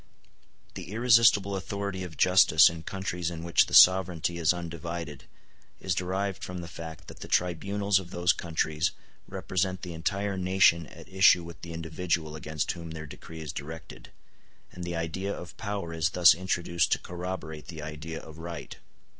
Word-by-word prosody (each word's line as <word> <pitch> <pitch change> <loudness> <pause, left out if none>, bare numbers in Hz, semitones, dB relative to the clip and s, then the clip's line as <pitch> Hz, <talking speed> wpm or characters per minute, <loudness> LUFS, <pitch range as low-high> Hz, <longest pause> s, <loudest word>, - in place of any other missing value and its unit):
The - - -8
irresistible 115 -4 +4
authority 100 0 -4
of 85 -3 -9
justice 90 -3 +6
in 85 0 -8
countries 90 -1 -3
in 85 -1 -7
which 85 0 +3
the - - -9
sovereignty 90 -2 +5
in 85 - -5
undivided 85 -4 -6 0.5
is 95 - -1
derived 95 +1 -2
from 90 -1 -5
the 85 - -7
fact 80 -1 -9
that - - -11
the - - -8
tribunals 100 +3 +1
of 90 -2 -10
those 85 -1 +2
countries 80 -1 -1 0.3
represent 95 0 -2
the 90 -2 -6
entire 100 +4 -2
nation 90 -3 +3
at 85 0 -13
issue 95 -1 +5
with 85 -1 -11
the 85 - -8
individual 80 -1 -2
against 75 -1 -3
whom 85 -1 -8
their 80 0 -7
decree 80 +2 -10
is 75 -2 -6
directed, 80 +3 -9 0.6
and 90 - -8
the 85 0 -4
idea 85 +4 -3
of 90 -4 -8
power 100 -6 -4
is 80 0 +1
thus 90 -1 +7
introduced 85 -1 -1
to - - +1
corroborate 85 -4 -6
the 80 -3 -8
idea 80 +1 -6
of 80 0 -12
right. 85 0 -7
85 Hz, 165 wpm, -28 LUFS, 80-95 Hz, 0.6 s, thus